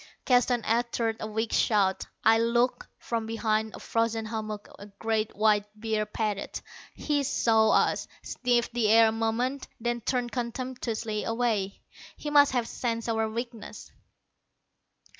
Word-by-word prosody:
Keston 245 -2 +3
uttered 230 -1 0
a 215 - -4
weak 220 +1 -2
shout. 200 -4 +2 0.2
I 225 +1 +5
looked. 235 +2 +1
From 230 -2 -3
behind 220 -1 -1
a - - -9
frozen 230 -1 -1
hummock 215 -1 -5
a 205 - -10
great 215 +1 -2
white 210 -1 +3
bear 215 -1 -1
padded. 210 -2 -3 0.4
He 295 -1 0
saw 225 -5 +3
us, - - +2 0.2
sniffed 245 -2 0
the 235 -3 +1
air 225 +1 +7
a - - -1
moment, 230 +5 -1
then 240 +1 -2
turned 245 +1 -1
contemptuously 235 -3 -3
away. 225 -4 -1 0.3
He 295 - -5
must 285 -2 +6
have 240 -2 0
sensed 230 -1 -3
our 225 -1 0
weakness. 235 0 -7
225 Hz, 140 wpm, -28 LUFS, 220-240 Hz, 0.4 s, air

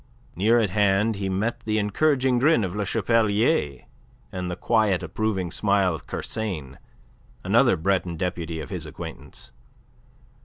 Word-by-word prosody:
Near 110 +6 +3
at 110 -5 +1
hand 105 +1 +2
he 100 -1 -2
met 105 +5 -1
the 110 0 -2
encouraging 130 +4 +2
grin 145 -3 +4
of 95 0 -3
Le 105 -2 -2
Chapelier, 110 - +1 0.5
and 90 -1 -4
the 90 - -3
quiet, 105 -3 +1
approving 95 0 -2
smile 100 -2 +1
of 80 - -8
Kersain, 80 -12 -5 0.6
another - - +3
Breton 90 0 -1
deputy 85 -2 -3
of 75 - -8
his - - -5
acquaintance. 70 -3 -9
100 Hz, 140 wpm, -24 LUFS, 90-110 Hz, 0.6 s, grin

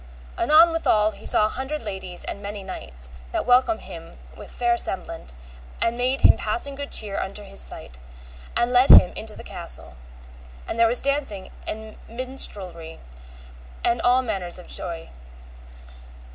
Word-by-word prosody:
Anon 315 +7 +5
withal 215 -10 +2
he - - -10
saw 215 - +4
an 215 - -1
hundred 265 +3 -4
ladies 190 -4 -5
and 200 - -5
many 200 0 -6
knights, 65 - -9 0.2
that - - -2
welcomed 255 +7 +3
him - - -11 0.2
with - - -11
fair 240 -1 +1
semblant, 180 - -3 0.5
and 230 - +1
made 255 +2 0
him - - +6
passing 285 -5 -2
good 280 +1 -6
cheer 205 -2 -1
unto 200 +2 -5
his 195 0 -7
sight, 60 - -9 0.6
and 240 +1 +1
led 250 +2 +5
him 180 - +9
into 215 -1 -7
the - - -10
castle, - - -5 0.7
and 230 - -4
there 230 - +6
was 240 +2 +4
dancing 275 -9 -1 0.2
and 220 0 -5
minstrelsy 205 -10 +1 0.8
and 235 -1 +1
all 250 +1 +3
manner 195 -7 -3
of 175 +1 -6
joy. 165 -1 -4
220 Hz, 155 wpm, -23 LUFS, 190-255 Hz, 0.8 s, him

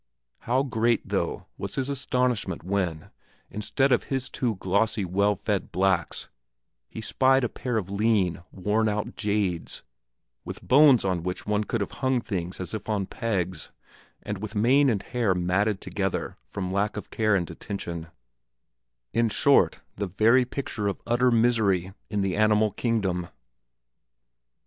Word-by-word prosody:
How 130 +3 +3
great, 115 -3 +1
though, - - -2
was - - -5
his 135 -1 -1
astonishment 125 - -1
when, 90 -4 -2 0.4
instead 135 +6 0
of 125 - +3
his 135 -2 -2
two 120 -4 -1
glossy, 100 +3 0
well 100 +3 +2
fed 100 0 -2
blacks, 95 -1 0 0.6
he 110 - -7
spied 130 +3 +3
a - - +2
pair 125 -3 -3
of 95 -3 -3
lean, 100 -4 +1
worn 105 +3 0
out 105 0 -3
jades, 100 -5 -2 0.6
with - - -8
bones 135 -4 +6
on 90 -3 0
which 90 +1 -4
one 105 0 0
could 115 0 -2
have 100 - -3
hung 130 -1 +2
things 90 -6 -4
as 95 - -5
if 110 - -5
on 105 -3 0
pegs, 95 -6 -3 0.5
and 105 -2 -4
with 110 0 -6
mane 130 +6 +4
and 105 -5 0
hair 115 -6 0
matted 95 +3 +1
together 95 -2 -2
from 95 -2 -4
lack 105 +2 0
of 105 - -7
care 110 -2 +2
and 90 -3 -1
attention 85 -2 -6 1.1
in 115 0 +2
short, 105 - +3 0.2
the 100 0 -2
very 115 +7 +4
picture 120 -5 -3
of 100 - -2
utter 120 +2 +3
misery 110 -6 +2 0.2
in 105 -1 -1
the 95 -2 0
animal 110 0 +3
kingdom! 95 -6 -1
105 Hz, 150 wpm, -26 LUFS, 95-115 Hz, 1.1 s, bones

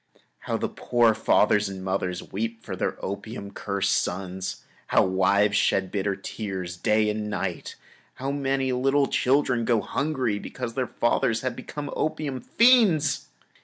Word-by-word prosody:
How - - -2
the - - -1
poor 120 -2 +2
fathers 105 -1 +3
and 95 -1 -7
mothers 95 -1 -2
weep 115 +2 -3
for - - -5
their - - -2
opium 100 +1 -6
cursed 100 -1 -1
sons. 95 0 -4 0.2
How - - +4
many 95 - -2
wives 100 +2 +3
shed 95 -2 +1
bitter 100 -1 -1
tears 95 -3 -5
day 105 +4 +2
and 105 0 -3
night! 95 -3 -4 0.4
How 135 +2 -3
many 135 -1 0
little 135 +3 +2
children 130 -3 +2
go 115 -1 +2
hungry 130 -6 -1
because 125 0 -6
their 130 0 -1
fathers 120 -1 +1
have 130 -2 -2
become 145 +3 -6
opium 145 -4 -2
fiends! 225 - +4
110 Hz, 150 wpm, -25 LUFS, 100-135 Hz, 0.4 s, How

